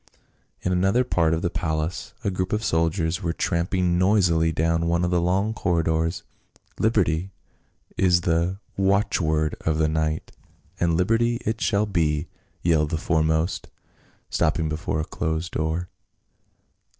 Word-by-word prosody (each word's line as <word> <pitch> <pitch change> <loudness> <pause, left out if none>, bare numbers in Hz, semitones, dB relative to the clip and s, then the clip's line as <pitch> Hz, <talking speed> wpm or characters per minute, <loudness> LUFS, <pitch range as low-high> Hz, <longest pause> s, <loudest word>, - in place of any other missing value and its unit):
In 90 - 0
another 95 +7 +3
part 85 -9 +1
of 80 +1 -1
the 85 - 0
palace 80 0 -3
a 100 - 0
group 95 +1 -2
of 105 +1 0
soldiers 80 +1 0
were 85 -3 -1
tramping 85 +1 0
noisily 90 -4 +3
down 80 +1 +1
one 85 +1 +1
of 90 - -1
the 90 -1 +2
long 95 +5 +1
corridors. 80 -3 0 0.3
" - - -31
Liberty 95 -5 +1 0.7
is 90 -2 +4
the 85 +2 0 0.2
watchword 90 -6 +1
of 80 -1 0
the 80 -1 +2
night, 80 0 -1 0.5
and 85 -1 +2
liberty 115 +6 +2
it 110 +1 -2
shall 105 -1 +2
be 80 -6 0 0.2
!" - - -40
yelled 80 -3 +2
the 80 - -1
foremost, 80 +1 0 0.6
stopping 80 - +1
before 80 +2 -2
a 80 - -1
closed 80 +2 -3
door. 80 +3 -2
85 Hz, 145 wpm, -24 LUFS, 80-95 Hz, 0.7 s, is